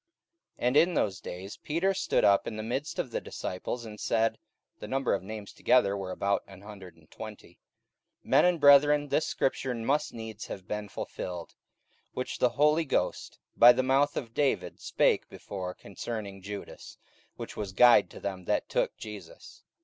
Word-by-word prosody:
44:001:015 -, -, 0 dB
And 130 Hz, -, +2 dB
in 170 Hz, +4 st, +5 dB
those 100 Hz, -3 st, 0 dB
days 95 Hz, +3 st, -8 dB
Peter 170 Hz, +6 st, 0 dB
stood 190 Hz, -, +1 dB
up 100 Hz, -1 st, +4 dB
in 110 Hz, -, -4 dB
the 110 Hz, -, -4 dB
midst 135 Hz, +7 st, -3 dB
of 125 Hz, -, -3 dB
the -, -, -2 dB
disciples, 115 Hz, +6 st, -5 dB
and 105 Hz, -1 st, -9 dB
said, 115 Hz, -1 st, +1 dB, 0.4 s
(the -, -, -7 dB
number 135 Hz, 0 st, 0 dB
of 100 Hz, -, 0 dB
names 105 Hz, +1 st, -8 dB
together 100 Hz, -6 st, +3 dB
were 95 Hz, -2 st, -5 dB
about 100 Hz, +2 st, 0 dB
an 95 Hz, -1 st, -13 dB
hundred 100 Hz, -5 st, -11 dB
and 80 Hz, -1 st, -24 dB
twenty,) -, -, -10 dB, 0.7 s
44:001:016 -, -, -15 dB
Men -, -, +6 dB
and 180 Hz, -2 st, +2 dB
brethren, 145 Hz, 0 st, +6 dB
this 150 Hz, +3 st, +1 dB
scripture 130 Hz, -1 st, -1 dB
must 140 Hz, +7 st, 0 dB
needs 110 Hz, -2 st, -8 dB
have 95 Hz, -2 st, -8 dB
been 105 Hz, -1 st, -4 dB
fulfilled, 90 Hz, -3 st, -6 dB, 0.6 s
which 125 Hz, -, -4 dB
the 125 Hz, -, +4 dB
Holy 150 Hz, +4 st, +3 dB
Ghost 145 Hz, -, -2 dB, 0.2 s
by 120 Hz, +1 st, +9 dB
the 130 Hz, +1 st, +1 dB
mouth 135 Hz, +2 st, +2 dB
of 115 Hz, -5 st, -5 dB
David 140 Hz, 0 st, 0 dB
spake -, -, +1 dB
before 90 Hz, -2 st, -6 dB
concerning 100 Hz, -1 st, -7 dB
Judas, 100 Hz, +1 st, -8 dB, 0.4 s
which -, -, -8 dB
was 100 Hz, -3 st, -4 dB
guide 120 Hz, +1 st, +6 dB
to -, -, -11 dB
them 95 Hz, -2 st, -5 dB
that 105 Hz, -, 0 dB
took -, -, 0 dB
Jesus. -, -, -10 dB
115 Hz, 180 wpm, -29 LUFS, 100-140 Hz, 0.7 s, by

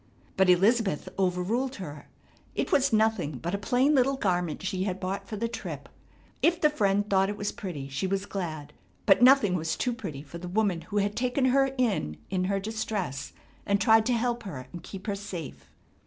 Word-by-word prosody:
But 190 Hz, -1 st, +4 dB
Elizabeth 195 Hz, -1 st, +3 dB
overruled 195 Hz, +9 st, 0 dB
her. 150 Hz, -7 st, -8 dB, 0.5 s
It -, -, -1 dB
was 275 Hz, 0 st, +3 dB
nothing 220 Hz, -8 st, +2 dB
but 170 Hz, +7 st, -4 dB
a 200 Hz, -, -1 dB
plain 250 Hz, +8 st, +2 dB
little 275 Hz, 0 st, +3 dB
garment 180 Hz, -, -1 dB
she 190 Hz, -1 st, -1 dB
had 190 Hz, -1 st, -2 dB
bought 195 Hz, +1 st, -4 dB
for 215 Hz, -, -5 dB
the 230 Hz, +3 st, -1 dB
trip. 230 Hz, -, -6 dB, 0.5 s
If 340 Hz, 0 st, +3 dB
the 300 Hz, -2 st, +4 dB
friend 205 Hz, -6 st, +1 dB
thought 195 Hz, -1 st, +3 dB
it 205 Hz, -, -4 dB
was 205 Hz, 0 st, -2 dB
pretty 150 Hz, -9 st, -6 dB
she 140 Hz, +7 st, -2 dB
was 195 Hz, +1 st, -1 dB
glad, 155 Hz, -7 st, -5 dB, 0.3 s
but -, -, +5 dB
nothing 255 Hz, -6 st, +6 dB
was 160 Hz, -2 st, -1 dB
too 250 Hz, -, -1 dB
pretty 155 Hz, -, -6 dB
for 170 Hz, +3 st, -9 dB
the 180 Hz, -, -7 dB
woman 195 Hz, -3 st, +1 dB
who 210 Hz, -, -2 dB
had 205 Hz, 0 st, +1 dB
taken 250 Hz, +2 st, +1 dB
her 270 Hz, 0 st, +3 dB
in 200 Hz, -, 0 dB
in 185 Hz, -1 st, 0 dB
her 195 Hz, +1 st, 0 dB
distress 205 Hz, -8 st, -3 dB, 0.3 s
and 200 Hz, 0 st, +1 dB
tried 220 Hz, +1 st, +5 dB
to 250 Hz, -, +2 dB
help 240 Hz, 0 st, 0 dB
her 135 Hz, -, -7 dB
and 175 Hz, -, -7 dB
keep 190 Hz, +2 st, -9 dB
her 205 Hz, -, -1 dB
safe. 170 Hz, -, -7 dB
200 Hz, 200 wpm, -28 LUFS, 180-230 Hz, 0.5 s, nothing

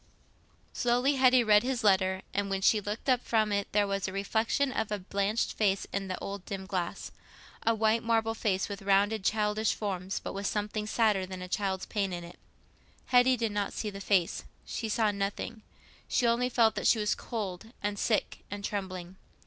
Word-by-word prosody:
Slowly 245 Hz, +4 st, +2 dB
Hetty 255 Hz, -1 st, +6 dB
had 230 Hz, -, -3 dB
read 210 Hz, -1 st, +7 dB
this 250 Hz, -1 st, -2 dB
letter; 190 Hz, -2 st, +3 dB
and 200 Hz, 0 st, -1 dB
when 195 Hz, 0 st, -1 dB
she 210 Hz, +2 st, +4 dB
looked 210 Hz, +5 st, -5 dB
up 250 Hz, -2 st, +3 dB
from 215 Hz, -2 st, +1 dB
it 200 Hz, -1 st, 0 dB
there 205 Hz, 0 st, +3 dB
was 195 Hz, -1 st, -2 dB
the -, -, -3 dB
reflection 220 Hz, +7 st, 0 dB
of 220 Hz, -4 st, -2 dB
a 210 Hz, -, 0 dB
blanched 200 Hz, +3 st, -1 dB
face 200 Hz, -2 st, +1 dB
in 195 Hz, 0 st, -2 dB
the 185 Hz, -, -3 dB
old 200 Hz, -1 st, -6 dB
dim 195 Hz, -2 st, -5 dB
glass—a 190 Hz, +4 st, -4 dB
white 220 Hz, +1 st, +2 dB
marble 225 Hz, -1 st, +1 dB
face 195 Hz, -4 st, 0 dB
with 200 Hz, -1 st, -6 dB
rounded 200 Hz, +2 st, +2 dB
childish 210 Hz, +1 st, +1 dB
forms, 190 Hz, -2 st, -3 dB
but -, -, -6 dB
with 195 Hz, 0 st, -3 dB
something 210 Hz, 0 st, -2 dB
sadder 215 Hz, -4 st, +2 dB
than 185 Hz, -1 st, -6 dB
a -, -, -6 dB
child's 190 Hz, 0 st, -1 dB
pain 200 Hz, -3 st, -1 dB
in 175 Hz, -1 st, -5 dB
it. 170 Hz, -, -12 dB, 0.7 s
Hetty 250 Hz, 0 st, +4 dB
did 225 Hz, -2 st, -1 dB
not 205 Hz, -1 st, -2 dB
see 210 Hz, -, -3 dB
the 195 Hz, 0 st, -8 dB
face—she 200 Hz, +4 st, -1 dB
saw 215 Hz, 0 st, +2 dB
nothing—she 205 Hz, +4 st, -4 dB
only 235 Hz, +2 st, +2 dB
felt 230 Hz, -3 st, +4 dB
that -, -, -1 dB
she -, -, +5 dB
was 210 Hz, -1 st, +1 dB
cold 205 Hz, -5 st, -5 dB, 0.2 s
and 205 Hz, 0 st, -2 dB
sick 220 Hz, -, 0 dB
and 205 Hz, 0 st, -5 dB
trembling. 185 Hz, -2 st, -5 dB
205 Hz, 190 wpm, -30 LUFS, 195-225 Hz, 0.7 s, read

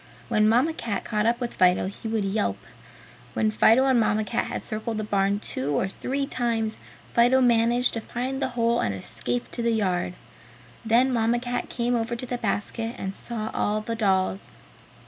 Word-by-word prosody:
When 215 Hz, 0 st, +3 dB
Mamma 255 Hz, +8 st, +3 dB
Cat 230 Hz, -10 st, -3 dB
caught 210 Hz, 0 st, 0 dB
up 235 Hz, +1 st, +2 dB
with 245 Hz, -2 st, -3 dB
Fido 180 Hz, 0 st, +3 dB
he 200 Hz, +4 st, -6 dB
would 220 Hz, -2 st, 0 dB
yelp. 195 Hz, -, 0 dB, 0.8 s
When 215 Hz, -1 st, +2 dB
Fido 225 Hz, +4 st, +5 dB
and 260 Hz, -3 st, +4 dB
Mamma 215 Hz, -1 st, +2 dB
Cat 230 Hz, +2 st, -1 dB
had -, -, -5 dB
circled 220 Hz, 0 st, -2 dB
the 215 Hz, -, -2 dB
barn 200 Hz, -1 st, +1 dB
two 140 Hz, -7 st, -2 dB
or -, -, 0 dB
three 275 Hz, +8 st, -3 dB
times 230 Hz, -5 st, -1 dB, 0.3 s
Fido 245 Hz, +2 st, +5 dB
managed 240 Hz, 0 st, +3 dB
to 230 Hz, -, -2 dB
find 255 Hz, +4 st, -4 dB
the 265 Hz, -, 0 dB
hole 235 Hz, 0 st, +2 dB
and 100 Hz, -, 0 dB
escape 120 Hz, +5 st, -4 dB
to -, -, -4 dB
the 235 Hz, -, +1 dB
yard; 185 Hz, -4 st, 0 dB, 0.7 s
then 240 Hz, +3 st, +3 dB
Mamma 230 Hz, 0 st, +2 dB
Cat 245 Hz, 0 st, -3 dB
came 245 Hz, 0 st, -1 dB
over 235 Hz, 0 st, -1 dB
to 235 Hz, -, -5 dB
the 245 Hz, 0 st, -4 dB
basket 225 Hz, +2 st, -2 dB
and 190 Hz, 0 st, -4 dB
saw 220 Hz, -2 st, -5 dB
all 210 Hz, +1 st, 0 dB
the 220 Hz, +2 st, -4 dB
dolls. 190 Hz, -3 st, 0 dB
225 Hz, 185 wpm, -25 LUFS, 205-240 Hz, 0.8 s, Fido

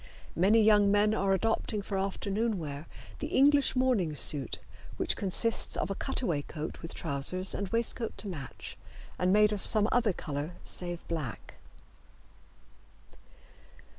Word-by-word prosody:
Many 210 Hz, +6 st, +4 dB
young 210 Hz, -1 st, +5 dB
men 205 Hz, +1 st, +3 dB
are 195 Hz, -3 st, +1 dB
adopting 210 Hz, +1 st, 0 dB
for 195 Hz, -, -4 dB
afternoon 200 Hz, +3 st, -1 dB
wear 150 Hz, -2 st, -6 dB, 0.3 s
the -, -, -3 dB
English 285 Hz, +1 st, +3 dB
morning 240 Hz, -12 st, +1 dB
suit, 140 Hz, -2 st, 0 dB, 0.4 s
which -, -, 0 dB
consists 205 Hz, +4 st, +1 dB
of -, -, -2 dB
a -, -, +1 dB
cutaway 190 Hz, -, -2 dB
coat 155 Hz, +2 st, -7 dB
with 165 Hz, -, -8 dB
trousers 160 Hz, +6 st, +1 dB
and 200 Hz, -, -3 dB
waistcoat 230 Hz, +2 st, 0 dB
to 210 Hz, -, -3 dB
match 145 Hz, -9 st, -8 dB, 0.4 s
and 180 Hz, 0 st, +2 dB
made 210 Hz, +1 st, +4 dB
of 205 Hz, -, -4 dB
some 215 Hz, -1 st, +3 dB
other 235 Hz, -4 st, +3 dB
color 150 Hz, -1 st, -5 dB
save 175 Hz, -1 st, -5 dB
black. 155 Hz, -8 st, -5 dB
195 Hz, 135 wpm, -30 LUFS, 165-220 Hz, 0.4 s, young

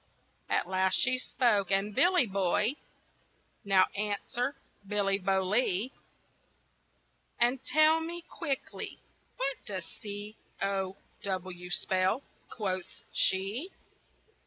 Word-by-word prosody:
At -, -, +1 dB
last 190 Hz, 0 st, +2 dB
she 255 Hz, -1 st, +3 dB
spoke, 215 Hz, -7 st, +2 dB
and 195 Hz, +1 st, +1 dB
"Billy 355 Hz, -, +5 dB
boy! 200 Hz, +3 st, +2 dB, 0.9 s
Now 195 Hz, -2 st, +5 dB
answer, 210 Hz, +6 st, -1 dB, 0.3 s
Billy 200 Hz, -1 st, +1 dB
Bolee, 195 Hz, +4 st, +1 dB, 1.5 s
And 245 Hz, +2 st, +2 dB
tell 310 Hz, +4 st, +5 dB
me 340 Hz, +1 st, -4 dB
quickly, 285 Hz, -6 st, -4 dB, 0.4 s
what 275 Hz, 0 st, -1 dB
does 190 Hz, -4 st, -3 dB
C 205 Hz, +1 st, -7 dB, 0.2 s
O 195 Hz, -1 st, -1 dB, 0.2 s
W 185 Hz, -2 st, -4 dB
spell?" 190 Hz, +7 st, +1 dB, 0.3 s
quoth 185 Hz, -4 st, -3 dB
she. 200 Hz, -, +1 dB
205 Hz, 95 wpm, -31 LUFS, 190-255 Hz, 1.5 s, Billy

